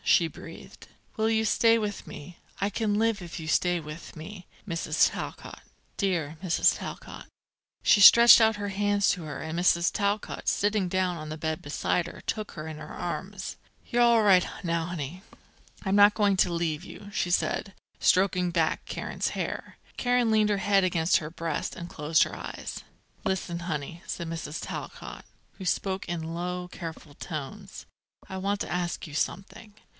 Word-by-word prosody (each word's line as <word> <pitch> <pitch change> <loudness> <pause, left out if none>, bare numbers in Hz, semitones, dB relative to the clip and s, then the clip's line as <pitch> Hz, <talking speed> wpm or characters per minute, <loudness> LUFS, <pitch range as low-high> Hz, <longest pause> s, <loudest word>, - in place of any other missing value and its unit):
she 170 - +4
breathed. 165 +1 -12 0.3
"Will 220 0 +1
you 220 0 +2
stay 230 +1 +4
with 210 -2 -3
me? 170 +4 -10 0.2
I 200 +2 0
can 210 0 0
live 220 -1 +1
if 170 0 -7
you 160 - -7
stay 175 +2 +2
with 155 +3 -9
me, 180 +4 -9 0.2
Mrs. 170 -2 +2
Talcott - - -7 0.3
dear 170 -6 -1
Mrs. 175 -3 +3
Talcott." - - -8 0.6
She 205 - +5
stretched 235 +3 +10
out 220 -1 +4
her 205 0 -4
hands 205 0 +1
to 175 - -3
her, 155 - -6
and 160 +1 -4
Mrs. 175 -1 +3
Talcott, 205 0 -2
sitting 205 -2 +1
down 185 -1 0
on 155 -1 -7
the 155 - -5
bed 160 0 -3
beside 165 +4 -1
her, - - -10
took 215 -2 -4
her 155 -1 -7
in 155 -1 -6
her - - -9
arms. 190 +2 -5 0.3
"You're 240 - +1
all 235 -2 +5
right, 190 -3 +6 0.2
now, 170 -1 0
honey. 175 0 -5 0.6
I'm 190 +1 +1
not 205 0 +7
going 205 -3 +3
to 180 - +3
leave 165 -3 -1
you," 205 +1 -11
she 180 - 0
said, 190 +2 0 0.3
stroking 185 -1 +3
back 165 -2 0
Karen's - - -3
hair. - - -5 0.2
Karen 245 -2 +2
leaned 215 -1 +3
her 205 - +2
head 195 0 +3
against 170 -2 +3
her 150 - -5
breast, 165 -2 -3
and 170 - -7
closed 155 +1 +2
her - - -5
eyes. - - -7 0.4
"Listen, 190 -4 -2
honey," 170 0 -4
said 170 - -4
Mrs. 165 -2 -5
Talcott, - - -7 0.3
who 190 - -9
spoke 190 +1 -1
in 165 -1 -3
low, 180 +1 -3
careful 165 -4 -8
tones: 175 +7 -7 0.4
"I 190 - -6
want 200 +2 -1
to - - -4
ask 175 -1 -2
you 155 - -10
something. 195 +6 -4
180 Hz, 175 wpm, -27 LUFS, 165-205 Hz, 0.6 s, stretched